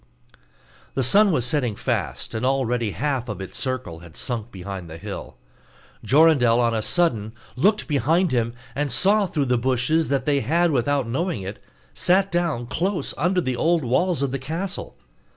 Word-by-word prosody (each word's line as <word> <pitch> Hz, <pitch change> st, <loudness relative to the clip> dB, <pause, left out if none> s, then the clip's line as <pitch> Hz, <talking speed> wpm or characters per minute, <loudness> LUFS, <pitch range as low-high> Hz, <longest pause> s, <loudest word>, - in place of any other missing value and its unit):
The 135 Hz, -, +1 dB
sun 200 Hz, -, +5 dB
was 125 Hz, -8 st, +1 dB
setting 125 Hz, -5 st, 0 dB
fast, -, -, -3 dB
and 110 Hz, -, -3 dB
already 125 Hz, -4 st, +1 dB
half 125 Hz, -, -2 dB
of 105 Hz, -3 st, -5 dB
its 95 Hz, -, -7 dB
circle 130 Hz, -11 st, -4 dB
had 85 Hz, -2 st, -14 dB
sunk 120 Hz, -2 st, -3 dB
behind 95 Hz, -2 st, -7 dB
the 80 Hz, -, -8 dB
hill: -, -, -8 dB, 0.7 s
Jorindel 130 Hz, -2 st, +5 dB
on 120 Hz, -1 st, +2 dB
a 110 Hz, -, 0 dB
sudden 110 Hz, -8 st, 0 dB, 0.2 s
looked 205 Hz, -, +2 dB
behind 160 Hz, +5 st, +2 dB
him, 115 Hz, -1 st, 0 dB, 0.2 s
and 145 Hz, 0 st, -2 dB
saw 200 Hz, -, +3 dB
through 150 Hz, -5 st, -1 dB
the 125 Hz, -2 st, +1 dB
bushes 130 Hz, +6 st, +1 dB
that 135 Hz, -2 st, 0 dB
they 145 Hz, -1 st, +2 dB
had, 165 Hz, +8 st, +2 dB
without 140 Hz, 0 st, +1 dB
knowing 130 Hz, -, -2 dB
it, 95 Hz, +3 st, -7 dB, 0.3 s
sat 190 Hz, -, +2 dB
down 170 Hz, -8 st, 0 dB
close 175 Hz, +5 st, -2 dB
under 180 Hz, +5 st, +1 dB
the 130 Hz, -5 st, -2 dB
old 165 Hz, +3 st, +1 dB
walls 145 Hz, +5 st, +1 dB
of 135 Hz, -, -1 dB
the 135 Hz, -, -2 dB
castle. 165 Hz, +8 st, -4 dB
130 Hz, 170 wpm, -23 LUFS, 115-165 Hz, 0.7 s, sun